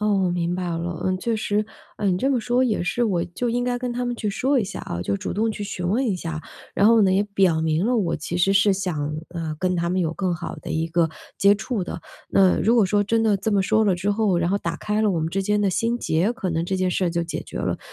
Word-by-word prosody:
哦， 210 - +1 0.2
我 180 - +1
明 175 0 -1
白 185 - -3
了， 170 0 -4
嗯， 185 0 +1
确 230 +2 -1
实， 210 0 0 0.3
哎， 200 -2 +1
你 180 - 0
这 270 - +1
么 265 -3 +1
说 245 +3 +2
也 220 -7 0
是， 240 +7 0
我 180 -5 0
就 180 +8 -3
应 245 +1 0
该 245 0 -1
跟 245 -1 -3
他 245 +1 -2
们 245 - -2
去 215 - -2
说 265 +7 +1
一 225 - +1
下 195 - -6
啊， 85 - -5
就 100 +3 -1
主 - - -4
动 220 +4 0
去 210 - -6
询 180 -3 -4
问 240 +8 +1
一 205 -6 0
下， 165 -3 -5 0.3
然 200 - +2
后 230 -1 +6
呢， 190 -2 +4
也 195 - +3
表 180 -5 +3
明 160 +5 +1
了 250 - +2
我 180 -7 0
其 165 +3 -4
实 185 +3 +3
是 200 +1 +4
想， 160 -6 -2
呃， 165 -3 -4
跟 185 +1 0
他 170 0 0
们 185 +1 0
有 165 -2 0
更 185 0 -1
好 160 - -6
的 - - -8
一 160 +1 -1
个 165 0 +2 0.3
接 200 +1 +6
触 220 -1 -3
的， - - -6 0.3
那 190 -2 +4
如 225 +5 +3
果 230 - +5
说 205 +2 +2
真 225 +2 +1
的 215 -3 +3
这 205 +3 -2
么 200 -1 +3
说 220 +3 +2
了 200 -3 +3
之 190 +4 -1
后， 205 -3 +1
然 170 +1 +1
后 200 - +1
打 170 -3 -3
开 210 +4 -1
了 215 -2 +3
我 165 - 0
们 160 - -1
之 195 +2 -1
间 210 +1 +1
的 200 - +2
心 230 +5 0
结， 185 -1 +1
可 220 -7 -3
能 165 0 -1
这 190 +2 -2
件 185 -1 +1
事 180 0 +1
就 170 0 -1
解 170 - -4
决 - - -7
了。 - - -1
195 Hz, 310 characters per minute, -23 LUFS, 175-220 Hz, 0.3 s, 后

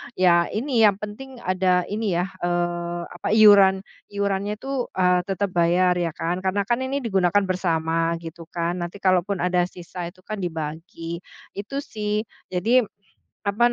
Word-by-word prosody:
ya 175 -2 +4
ini 230 0 +2
yang 200 -2 +5
penting 250 +5 -8
ada 185 -1 +2
ini 210 -2 -1
ya, 180 +2 -1
eee, 175 0 -1
apa, 175 - -6
iuran 200 -3 +7 0.3
iurannya 200 0 -1
itu, 270 0 -3
eee, 180 -1 +3
tetap 195 0 -1
bayar 175 +1 +3
ya 170 - 0
kan. 170 +2 -2
Karena 190 +2 0
kan 240 +3 0
ini 270 +1 -1
digunakan 195 -3 +2
bersama 165 -3 0
gitu 165 0 -9
kan, 170 +1 -2
nanti 175 +3 -5
kalaupun 185 +1 +2
ada 180 0 +2
sisa 175 0 -7
itu 185 +1 -20
kan 215 -1 -4
dibagi, 165 +1 -5 0.4
itu 205 +7 -6
sih. 210 -4 -2 0.3
Jadi 220 +8 +3 0.6
apa 220 +4 +2
185 Hz, 155 wpm, -23 LUFS, 175-205 Hz, 0.6 s, iuran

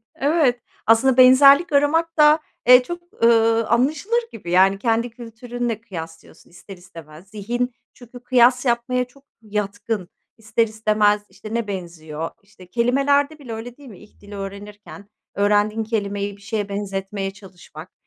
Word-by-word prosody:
Evet. 280 -5 +1 0.3
Aslında 245 +3 +4
benzerlik 275 +6 +7
aramak 325 +4 +1
da, 300 +1 +6 0.3
eee, 250 0 +8
çok, 345 -3 -9
ııı, 230 -1 +3
anlaşılır 310 - +1
gibi 175 -5 -8
yani 195 +2 +4
kendi 230 +1 0
kültürünle 235 -1 -6
kıyaslıyorsun 165 -7 -11
ister 185 +2 -13
istemez. 165 -1 -14
Zihin 240 +5 -3 0.2
çünkü 245 0 -14
kıyas 250 +1 +3
yapmaya 250 +1 0
çok 275 +3 -23 0.2
yatkın, 210 -2 -4 0.3
ister 225 +1 0
istemez 215 -1 +1
işte 205 +3 -10
ne 230 -2 -2
benziyor. 165 -4 -6
İşte 185 -2 -18
kelimelerde 275 +6 +1
bile 250 -5 -8
öyle 235 +2 -8
değil 285 -3 -14
mi? 200 - -13
İlk - - -20
dili 205 0 -11
öğrenirken 205 +1 -10 0.3
öğrendiğin 210 +2 +1
kelimeyi 205 -2 -3
bir - - -22
şeye 205 -1 -4
benzetmeye 195 -1 -4
çalışmak, 185 -4 -14
225 Hz, 140 wpm, -21 LUFS, 200-250 Hz, 0.3 s, eee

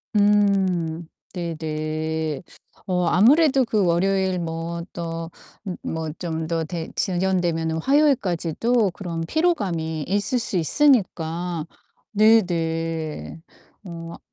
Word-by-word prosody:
음. 190 -5 +2 0.3
네네. 155 -2 -3 0.5
어 180 -2 +1
아무래도 265 - +5
그 215 -4 +1
월요일 185 +1 +1
뭐 165 0 -4
또 165 -1 -5 0.3
므 185 -4 -5
뭐 160 -1 -3
좀 160 -2 -3
더 165 -1 -1
되 165 0 -5
지연되면은 175 -3 0
화요일까지도 230 - +2
그런 170 -2 -5
피로감이 180 - 0
있을 205 +6 +1
수 205 - -2
있으니까. 175 - +1 0.5
네네. 165 -7 +1 0.4
어 165 -2 -7
아 - - -11
175 Hz, 195 characters per minute, -23 LUFS, 165-200 Hz, 0.5 s, 아무래도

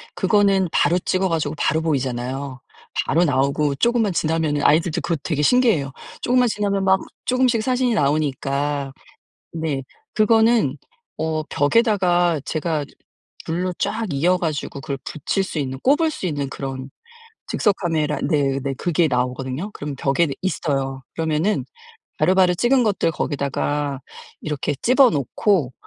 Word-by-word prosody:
그거는 195 -1 +3
바로 175 +1 +3
찍어 185 +1 0
가지고 160 -2 -1
바로 160 - +1
보이잖아요. 130 -2 -2 0.5
바로 170 +5 +2
나오고 140 +1 +1
쪼금만 225 - +1
지나면은 155 -3 0
아이들도 165 +2 +3
그거 165 - -1
되게 150 -4 -1
신기해 245 - +4
해요. 140 -1 -4 0.3
쪼금만 250 0 +3
지나면 200 -2 -1
막 190 0 +4 0.3
쪼금씩 255 -3 +2
사진이 250 -1 +1
나오니까 140 -1 0 0.6
네 160 -4 -2 0.3
그거는 225 +2 +3 0.4
어 160 -1 -1
벽에다가 175 - +2
제가 155 -2 -2 0.6
줄로 180 +3 -1
쫙 225 - -1
이어 170 +6 +2
가지고 155 -5 -3
그걸 140 -1 -4
붙일 175 +6 -2
수 175 - -5
있는 130 -1 -4
꼽을 305 - +3
수 245 - -5
있는 145 -4 -2
그런 135 -1 -6 0.6
즉석카메라 165 -7 0
네네 140 -3 0
그게 170 +1 +1
나오거든요. 130 +6 -2
그럼 145 -1 -6
벽에 140 +5 +1
있어요. 135 -7 -2
그러면은 160 +5 0 0.6
바로바로 185 -1 +4
찍은 245 +7 +3
것들 200 -6 +1
거기다가 145 -1 -2 0.4
이렇게 150 -2 -2
집어 255 +1 +5
놓고 145 - 0
160 Hz, 315 characters per minute, -21 LUFS, 140-195 Hz, 0.6 s, 집어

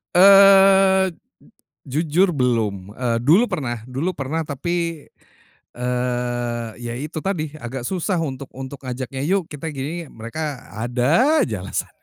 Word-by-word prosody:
Eee, 195 -1 +7 0.7
jujur 165 +6 +1
belum, 110 -8 0
eee, 120 -2 0
dulu 170 - +5
pernah 120 - -4
dulu 135 +8 -2
pernah 145 +4 -2
tapi, 165 +2 -3 0.7
eee, 120 -1 -2
iya 120 -1 -5
itu 155 +3 -7
tadi 160 -6 -2
agak 125 -2 -6
susah 185 -1 -1
untuk 135 -3 -4
untuk 135 +1 -7
ngajaknya 130 +1 -5
yuk 190 -3 +1
kita 150 +2 -6
gini, 150 +5 -4
mereka 130 +4 -6
ada 130 - +2
aja 105 -6 -5
alasan. 95 - -4
140 Hz, 125 wpm, -21 LUFS, 125-175 Hz, 0.7 s, Eee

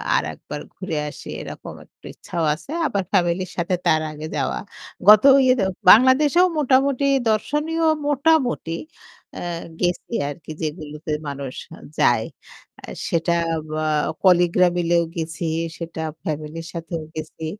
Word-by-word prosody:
আরেকবার 80 - -3
ঘুরে 180 -4 -4
আসি - - -11
এরকম - - -8
একটু - - -24
ইচ্ছাও 170 - -4
আছে 170 - -10 0.2
আবার 200 -5 -1
ফ্যামিলির 180 -1 +1
সাথে 175 +1 0
তার 155 0 +3
আগে 155 +1 -7
যাওয়া 135 -3 -1 0.5
গত 210 0 +9 0.2
ইয়েতে 255 -4 +3 0.3
বাংলাদেশেও 280 - +6
মোটামুটি 275 -1 +2 0.2
দর্শনীয় 300 +9 0 0.2
মোটামুটি 280 - +1 0.6
এ্যা 175 - -5 0.3
গেছি 180 +5 -1 0.2
আরকি 155 +2 -9
যেগুলোতে 155 0 -5 0.2
মানুষ 140 -2 -5 0.5
যায়। 115 -2 +3 0.6
আ - - -7 0.2
সেটা 170 +1 +1 0.5
আ - - 0 0.4
কলিগরা 180 -1 +5
মিলেও 170 0 +2
গেছি। 165 0 -4 0.3
সেটা 165 -1 -6 0.2
ফ্যামিলির 155 0 -5
সাথেও 165 -1 -5
গেছি। 160 +1 -6
170 Hz, 120 wpm, -22 LUFS, 155-240 Hz, 0.6 s, গত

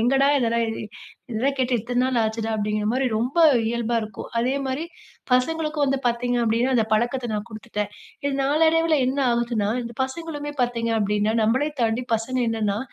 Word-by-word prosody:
எங்கடா 270 +4 +3
இதெல்லா 235 -1 +1 0.7
இதெல்லா 240 +4 +1
கேட்டு 255 -2 +1
எத்தனை 245 +3 -1
நாள் 255 -2 +1
ஆச்சுடா 220 +1 -2
அப்படிங்கிற 210 0 -1
மாரி 260 +1 +1
ரொம்ப 250 +8 -1 0.3
இயல்பா 235 0 -1
இருக்கும். 215 -2 -8
அதே 255 +3 +1
மாரி 270 +5 -2 0.5
பசங்களுக்கும் 305 +3 +1
வந்து 270 0 0
பார்த்தீங்க 245 +1 0
அப்டின்னா, 235 +4 +1
அந்த 225 - +2
பழக்கத்தை 240 +2 0
நான் 210 +2 -4
குடுத்துட்டேன். 215 -2 -4 0.3
இது 285 - 0
நாளடைவுல 320 +2 +3
என்ன 270 +2 -2
ஆகுதுன்னா, 235 -3 0
இந்த 235 0 -7
பசங்களுமே 295 +1 -6
பார்த்தீங்க 230 -1 -1
அப்டின்னா, 210 +1 +1
நம்மளே 260 +8 +2
தாண்டி 225 +2 +1
பசங்க 225 +4 -2
என்னன்னா, 210 -3 0
240 Hz, 160 wpm, -23 LUFS, 225-270 Hz, 0.7 s, எங்கடா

